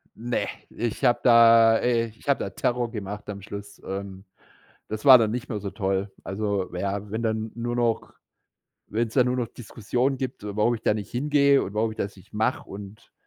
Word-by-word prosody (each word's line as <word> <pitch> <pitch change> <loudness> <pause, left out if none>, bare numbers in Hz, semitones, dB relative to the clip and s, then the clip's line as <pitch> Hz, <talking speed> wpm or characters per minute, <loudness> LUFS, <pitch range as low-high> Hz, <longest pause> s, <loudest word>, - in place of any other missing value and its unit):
Ne, 120 +2 -2 0.2
ich 120 -2 -4
habe 120 - +4
da 115 -2 +7
äh, 115 -1 +1
ich 110 +4 -17
habe 140 - +3
da - - -3
Terror 120 -1 -1
gemacht 105 -1 -6
am 100 -1 -6
Schluss. 100 0 -9
Ähm, 95 0 -6 0.6
das 110 +3 -5
war 130 -3 +10
dann 110 -2 +1
nicht 125 0 -4
mehr 110 - -3
so 100 -1 -5
toll. 95 -1 -2
Also, 100 -1 -2
ja, 100 +2 -3
wenn 110 +2 -3
dann 110 -1 -1
nur 120 +1 -3
noch 120 -2 0 0.7
wenn's 115 0 -2
dann 125 -2 +4
nur 125 0 0
noch 120 - -1
Diskussionen 120 +4 -2
gibt, 130 -5 -5
warum 105 +3 +1
ich 110 - -9
da 105 - +2
nicht 105 -2 -6
hingehe 140 +1 +3
und 100 - -6
warum 110 +1 0
ich 110 - -11
das 100 0 -4
nicht 95 - -18
mache 110 +4 -1
und 100 +1 -10
110 Hz, 200 wpm, -25 LUFS, 100-120 Hz, 0.7 s, war